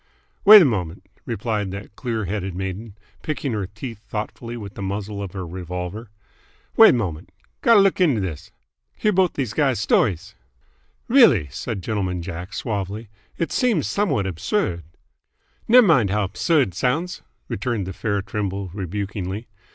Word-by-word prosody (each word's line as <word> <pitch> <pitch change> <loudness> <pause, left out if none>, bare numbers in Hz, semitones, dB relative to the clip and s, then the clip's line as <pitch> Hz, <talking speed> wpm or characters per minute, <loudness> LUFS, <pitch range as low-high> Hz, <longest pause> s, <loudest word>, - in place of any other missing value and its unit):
"Wait 210 +1 +12
a 180 - +6
mom'nt," 90 - -2 0.2
replied 105 -2 -2
that 100 +2 -8
clear 115 -4 -3
headed 95 -1 -3
maiden, 95 +3 -5 0.2
picking 150 -3 -3
her 100 -3 -2
teeth 105 +2 -8
thoughtfully 110 +3 -6
with 100 -3 -8
the - - -8
muzzle 100 +1 -4
of 100 -3 -6
her 95 -2 -5
revolver. 90 +5 -6 0.7
"Wait 225 - +8
mom'nt. 90 -8 -3 0.3
Gotta 230 -3 +6
look 195 -1 +3
'nto 150 -11 +3
this. 90 -7 -5 0.5
Hear 215 - +1
both 185 -2 +2
these 125 -7 -3
guys' 135 -4 +1
st'ries." 100 -2 +1 0.7
"Really," 165 - +5
said 95 - -5
Gentleman 95 -4 -2
Jack 90 +3 -7
suavely, 105 0 -4 0.3
"it 165 - -2
seems 235 - +1
somewhat 195 - 0
absurd 90 - -2 0.4
" - - -40
"Ney' 250 +3 +8
mind 155 - +4
how 105 +1 +1
'bsurd 140 - +1
't - - -18
sounds," 150 - -1 0.3
returned 105 -1 -2
the 95 - -6
fair 100 0 -2
Trimble 100 -2 -4
rebukingly. 100 +2 -4
105 Hz, 150 wpm, -22 LUFS, 95-125 Hz, 0.7 s, Wait